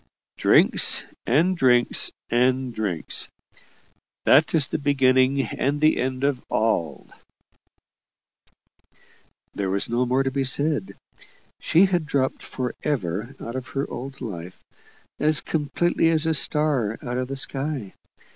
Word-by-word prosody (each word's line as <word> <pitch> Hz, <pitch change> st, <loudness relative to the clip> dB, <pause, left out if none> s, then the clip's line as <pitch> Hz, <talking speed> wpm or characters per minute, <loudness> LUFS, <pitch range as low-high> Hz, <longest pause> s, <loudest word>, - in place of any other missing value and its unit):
"Drinks -, -, +4 dB, 0.2 s
and 165 Hz, +9 st, +2 dB
drinks 125 Hz, -6 st, +3 dB, 0.2 s
and 125 Hz, +1 st, +1 dB
drinks. 100 Hz, -8 st, -3 dB, 1.0 s
That 155 Hz, +3 st, +4 dB
is 150 Hz, -3 st, +5 dB
the -, -, -4 dB
beginning 135 Hz, -1 st, +2 dB
and 140 Hz, +6 st, -2 dB
the 155 Hz, +1 st, +3 dB
end 130 Hz, +1 st, -3 dB
of 140 Hz, -3 st, 0 dB
all." 105 Hz, -7 st, -1 dB, 2.4 s
There 100 Hz, -2 st, -3 dB
was 100 Hz, +1 st, -1 dB
no 120 Hz, +2 st, 0 dB
more 130 Hz, +2 st, +1 dB
to 135 Hz, -, -2 dB
be 135 Hz, 0 st, -1 dB
said. 130 Hz, -7 st, +1 dB, 0.6 s
She 170 Hz, +4 st, +3 dB
had 175 Hz, -5 st, -1 dB
dropped 135 Hz, -2 st, -1 dB
for 125 Hz, -2 st, -5 dB
ever 115 Hz, -, -3 dB
out 115 Hz, -, -7 dB
of 130 Hz, -1 st, -5 dB
her 135 Hz, -, -1 dB
old 135 Hz, +2 st, -8 dB
life, 90 Hz, -5 st, -8 dB, 0.6 s
as 155 Hz, +1 st, +2 dB
completely 165 Hz, +2 st, 0 dB
as 160 Hz, -1 st, +1 dB
a 160 Hz, -, +1 dB
star 145 Hz, -8 st, +2 dB
out 125 Hz, 0 st, -4 dB
of 130 Hz, -, -3 dB
the 135 Hz, -, -5 dB
sky. 135 Hz, -3 st, -2 dB
130 Hz, 130 wpm, -23 LUFS, 120-145 Hz, 2.4 s, is